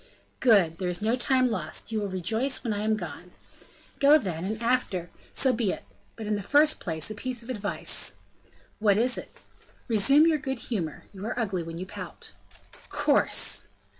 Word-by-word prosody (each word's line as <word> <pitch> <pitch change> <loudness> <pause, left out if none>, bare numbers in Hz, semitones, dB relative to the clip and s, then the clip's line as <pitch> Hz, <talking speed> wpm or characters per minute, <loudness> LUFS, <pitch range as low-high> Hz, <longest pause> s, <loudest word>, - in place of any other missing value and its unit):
"Good; 195 -10 +4
there 180 -2 -1
is 180 +3 -4
no 225 +3 +2
time 255 0 +2
lost, 175 +1 -2
you 220 - -1
will 205 - -2
rejoice 220 +9 -1
when 230 -4 -1
I 205 - -3
am 215 +1 +1
gone." 175 -1 -8 0.7
"Go, 285 +2 +7
then; 180 - -4
and 215 +2 -3
after 230 -7 -1
" - - -24
"So 265 -2 +3
be 225 -5 0
it; - - -6 0.3
but 220 - -7
in 210 - -1
the 205 - -1
first 295 +8 +4
place, 160 +2 -2
a - - -3
piece 245 +2 -3
of 250 - -6
advice." 205 -4 +1 0.6
"What 205 -2 +3
is 245 +3 +2
it?" - - -7 0.6
"Resume 275 +7 +5
your 320 -2 +3
good 265 -2 -3
humor, 190 - -4
you 195 0 -9
are 235 - -4
ugly 195 -6 -1
when 165 0 -7
you 185 - -5
pout." - - -9 0.6
"Coarse!" - - +3
215 Hz, 190 wpm, -27 LUFS, 185-255 Hz, 0.7 s, Go